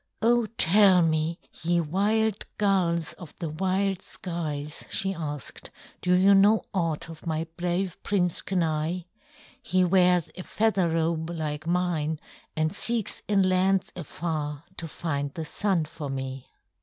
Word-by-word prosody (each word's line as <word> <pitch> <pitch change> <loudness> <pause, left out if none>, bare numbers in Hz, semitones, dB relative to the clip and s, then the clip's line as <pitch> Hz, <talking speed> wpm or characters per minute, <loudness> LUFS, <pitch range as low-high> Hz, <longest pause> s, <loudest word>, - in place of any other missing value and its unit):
"Oh, 235 0 +4
tell 190 0 +6
me, 160 +1 0 0.2
ye 170 +1 +2
wild 205 +6 0
Gulls, 175 -6 +1
of 170 -5 -11
the 165 - -4
wild 190 +4 0
skies," 155 -6 -5
she 195 0 +1
asked, 150 -5 -6 0.3
"do 180 - +2
you 190 +2 +6
know 205 +3 +5
aught 165 -5 -1
of 165 +1 -10
my 160 0 -1
brave 180 +1 -2
Prince 180 -4 0
Kenai? 165 -1 -1 0.6
He 185 -6 +2
wears 180 -2 +3
a 185 - -6
feather 200 -3 +1
robe 165 0 0
like 155 -2 -4
mine 170 -3 0 0.4
and 155 0 0
seeks 230 0 -1
in 195 -2 +3
lands 185 +1 +2
afar 155 -3 -4
to 165 - -4
find 145 -3 -3
the 160 - -4
Sun 185 -1 0
for 150 -2 -7
me." 135 -1 -5
175 Hz, 140 wpm, -26 LUFS, 155-190 Hz, 0.6 s, tell